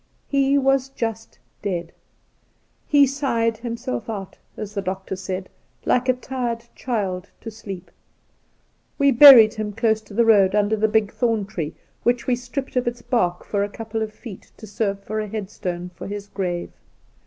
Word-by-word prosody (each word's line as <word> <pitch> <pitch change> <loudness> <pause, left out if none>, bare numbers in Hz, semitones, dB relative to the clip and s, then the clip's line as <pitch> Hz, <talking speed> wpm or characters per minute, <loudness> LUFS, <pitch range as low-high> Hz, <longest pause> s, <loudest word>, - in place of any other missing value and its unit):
He 275 0 +2
was 270 -1 +2
just 225 -4 -5 0.2
dead. 175 -4 -3 1.0
He 285 -1 +6
sighed 235 -5 0
himself 235 0 -4
out, 200 -4 -5 0.2
as 210 -1 -6
the 200 - -2
doctor 190 0 -4
said, 185 0 -5 0.4
like 250 +1 +2
a - - +6
tired 250 -2 -4
chUd 195 -7 -2 0.2
to 225 - -7
sleep. 195 -5 -9 1.1
We 280 0 +4
buried 240 -4 +10
him 215 -2 -3
dose 220 +1 +1
to 200 - -12
the 235 +1 +4
road 200 -3 +5
under 210 +1 +1
a - - +6
big 215 -1 +1
thorn 225 -4 0
tree, 165 -6 -5 0.3
which 240 0 +1
we 250 - +2
stripped 250 +3 -6
of 250 -1 +1
its 240 0 -3
bark 225 -8 0
for 200 -1 0
a 205 - -2
couple 225 +1 -5
of 215 -1 -2
feet 215 -3 -11
to 220 - -10
serve 200 -1 -2
for 215 +2 -3
a 215 - -3
headstone 185 -4 -5
for - - -8
his 205 0 -5
grave. 180 -4 -3
220 Hz, 170 wpm, -22 LUFS, 200-240 Hz, 1.1 s, buried